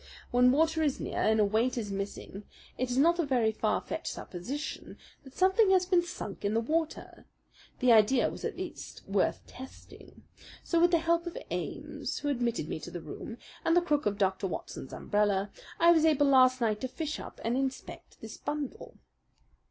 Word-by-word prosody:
When 250 +1 +5
water 320 +3 +2
is 290 -4 0
near - - -3
and 220 0 +3
a 210 - +5
weight 225 +5 +1
is 210 -4 -3
missing 195 0 -5 0.3
it 255 0 -2
is 245 - -1
not 340 +5 +4
a - - +3
very 245 -6 +2
far 220 - 0
fetched - - -5
supposition 265 - -6 0.3
that 265 -1 -15
something 380 +3 +4
has 375 -1 +4
been 360 -1 +3
sunk 345 - -7
in 205 +2 0
the - - +3
water. 315 +7 -3 0.5
The 250 -1 +5
idea 230 +3 +5
was - - -9
at - - -3
least - - -7
worth - - 0
testing; 260 +1 -13 0.4
so 335 -1 +1
with 350 - +6
the 340 - +4
help 335 +1 +1
of 345 - -6
Ames, - - -4
who 290 - -2
admitted 240 - -1
me - - -4
to - - -8
the 175 - -6
room, 225 +7 -8 0.3
and 330 +1 +3
the - - +6
crook 295 -7 +1
of 205 -1 -1
Dr. 195 -1 0
Watson's 135 -6 -6
umbrella, 205 -1 0 0.3
I 340 +1 +7
was 325 -2 +4
able 300 -3 +4
last 255 -2 +5
night 215 -2 0
to 260 - -1
fish 305 +3 -4
up - - -10
and 230 +2 0
inspect 265 0 -5
this - - -8
bundle. 295 -3 -5
260 Hz, 190 wpm, -30 LUFS, 215-320 Hz, 0.5 s, I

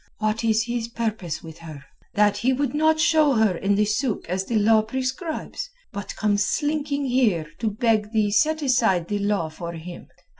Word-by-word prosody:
What 215 +1 -1
is 220 -1 +2
his 235 -1 -3
purpose 220 -9 -3
with 160 -1 -11
her—that 165 +6 -2
he 260 +2 +1
would 275 0 -1
not 315 +1 +3
show 310 -3 +4
her 220 -5 +3
in 195 +3 +1
the 210 +1 +3
suk 215 +3 -1
as 185 +2 -2
the 235 - -3
law 215 +1 +5
prescribes, 265 - -4 0.2
but 200 -1 -6
comes 205 -1 +1
slinking 290 +4 -1
here 240 -11 +2
to 225 - 0
beg 215 0 0
thee 215 -2 +1
set 310 +9 +2
aside 225 -10 +2
the 205 -1 -1
law 200 -4 0
for 170 +2 -7
him? 170 +2 -9
220 Hz, 180 wpm, -24 LUFS, 200-260 Hz, 0.2 s, law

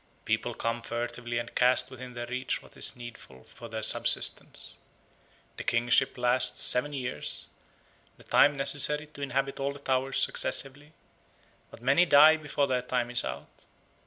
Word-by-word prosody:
People - - -1
come 115 +1 -3
furtively 120 0 -4
and 120 0 -5
cast 125 +1 +2
within 130 -1 -10
their 120 0 -5
reach 125 +2 -3
what - - -19
is - - -1
needful 120 - -12
for 120 -1 -12
their 110 0 -4
subsistence. 110 - +2 0.8
The - - -5
kingship 120 +2 +2
lasts 125 +1 +1
seven 125 +4 +1
years, 130 -3 -5 0.7
the - - -17
time 145 - +4
necessary 145 +1 +2
to 150 -1 -13
inhabit 135 0 -2
all 140 +1 -2
the - - -11
towers 135 -1 -1
successively; 145 +3 -1 0.8
but 115 - -15
many 140 +8 +4
die 155 +1 +7
before 150 -2 -1
their 130 -2 -1
time 125 -1 -2
is 120 - 0
out. - - -8
130 Hz, 155 wpm, -28 LUFS, 120-140 Hz, 0.8 s, die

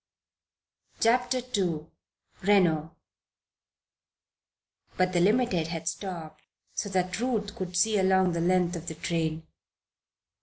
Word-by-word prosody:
CHAPTER 250 +2 +2
II 170 -6 0 0.6
RENO 175 -6 +3 2.0
But 185 0 +2
the 175 - +3
Limited 195 -3 +2
had 165 -1 -5
stopped 165 -1 -5 0.3
so 205 - -3
that 185 0 -1
Ruth 225 -4 -1
could 180 -1 -4
see 215 +2 +3
along 190 -1 +3
the 170 0 -1
length 180 0 +2
of 170 0 -7
the 160 - -4
train. 160 0 -2
185 Hz, 110 wpm, -28 LUFS, 165-205 Hz, 2.0 s, RENO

